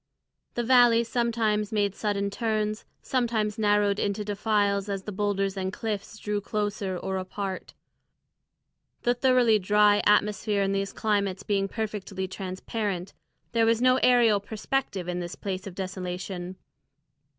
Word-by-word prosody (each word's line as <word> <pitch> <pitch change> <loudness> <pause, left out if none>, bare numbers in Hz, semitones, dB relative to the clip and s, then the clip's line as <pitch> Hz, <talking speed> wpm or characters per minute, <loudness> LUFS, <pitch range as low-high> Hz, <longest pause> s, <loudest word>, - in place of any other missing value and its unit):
The 240 - 0
valley 240 -1 +5
sometimes 225 -3 0
made 205 -2 +1
sudden 200 -1 -1
turns, 215 -1 -1 0.2
sometimes 225 -4 0
narrowed 205 -1 +2
into 205 +1 -1
defiles 205 -1 0
as 195 -1 -3
the 210 - -5
boulders 195 -1 -1
and 190 -1 -2
cliffs 210 -1 -4
drew 210 -1 -2
closer 205 -2 -2
or 190 +2 -3
apart. 190 0 -5 1.3
The 240 - +3
thoroughly 245 -3 +4
dry 205 +1 +4
atmosphere 210 0 +2
in 195 - 0
these 195 0 -1
climates 200 -3 -1
being 200 -1 0
perfectly 200 -3 -4
transparent, 190 0 -4 0.4
there 230 -1 +3
was 230 0 +3
no 255 +1 +4
aerial 240 -4 +5
perspective 210 -2 -3
in 180 0 -2
this 175 0 -5
place 190 -1 -5
of 185 - -8
desolation. 185 -1 -5
205 Hz, 135 wpm, -27 LUFS, 195-220 Hz, 1.3 s, valley